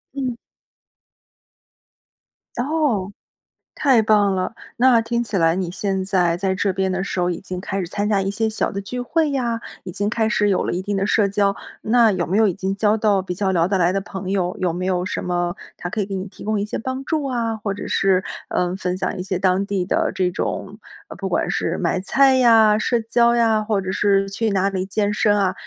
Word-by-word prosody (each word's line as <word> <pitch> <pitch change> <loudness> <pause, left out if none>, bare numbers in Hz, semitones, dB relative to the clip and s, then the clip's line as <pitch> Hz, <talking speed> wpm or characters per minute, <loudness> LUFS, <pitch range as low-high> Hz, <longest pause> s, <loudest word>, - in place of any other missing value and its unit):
嗯。 255 -4 -2 2.2
哦， 245 -8 0 0.6
太 265 -6 +4
棒 210 -2 +3
了。 185 +4 -2 0.2
那 245 -1 +5
听 235 +1 -1
起 225 -3 -4
来 165 -2 +3
你 185 -2 -2
现 190 +1 -2
在 175 -3 +1
在 190 0 0
这 195 +1 0
边 190 0 -1
的 185 +1 -1
时 190 - -3
候 180 0 +1
已 175 - -2
经 185 -2 -6
开 195 +1 -4
始 175 - -4
参 205 +3 -2
加 205 -2 +2
一 195 +1 -1
些 220 +1 0
小 215 - -1
的 200 - -4
聚 245 +6 -5
会 310 +4 0
呀， 235 -4 -1 0.2
已 180 - -7
经 205 +3 -1
开 220 -1 0
始 210 -3 +2
有 195 - +2
了 - - -2
一 180 - -2
定 205 +1 -3
的 195 0 0
社 205 -1 +3
交。 200 0 +1 0.3
那 230 0 +4
有 175 -2 -1
没 190 +5 0
有 220 -1 +5
已 185 - 0
经 195 +1 -2
交 210 0 +3
到 210 -3 +2
比 180 -1 -5
较 195 0 0
聊 170 -1 +2
得 195 - +1
来 175 0 +3
的 195 - 0
朋 190 -1 -7
友， 185 -2 0
有 180 - +1
没 180 +2 -4
有 180 -1 0
什 - - -3
么 175 -1 -1 0.2
他 175 - -6
可 215 - -4
以 200 - 0
给 195 - -5
你 190 0 -3
提 - - -12
供 215 -1 0
一 - - 0
些 210 - -4
帮 260 +3 -4
助 310 -1 -1
啊， 235 -4 -1
或 205 -2 -3
者 205 - -7
是， 190 -1 +2 0.2
呃， 180 0 -1
分 180 -1 -2
享 - - -2
一 - - -2
些 185 -1 -2
当 185 +1 +1
地 200 -2 -1
的 180 - 0
这 180 -1 +1
种， - - -4 0.4
不 - - -3
管 - - 0
是 - - -1
买 185 - 0
菜 265 +7 +4
呀， 225 -4 +5
社 235 +2 0
交 235 +1 +3
呀， 225 -2 +3
或 210 -2 0
者 190 0 -3
是 195 -1 +2
去 220 +2 -1
哪 195 0 +1
里 190 -1 -2
健 205 +1 -1
身 210 -1 +2
啊， 190 -2 +1
200 Hz, 250 characters per minute, -21 LUFS, 185-225 Hz, 2.2 s, 那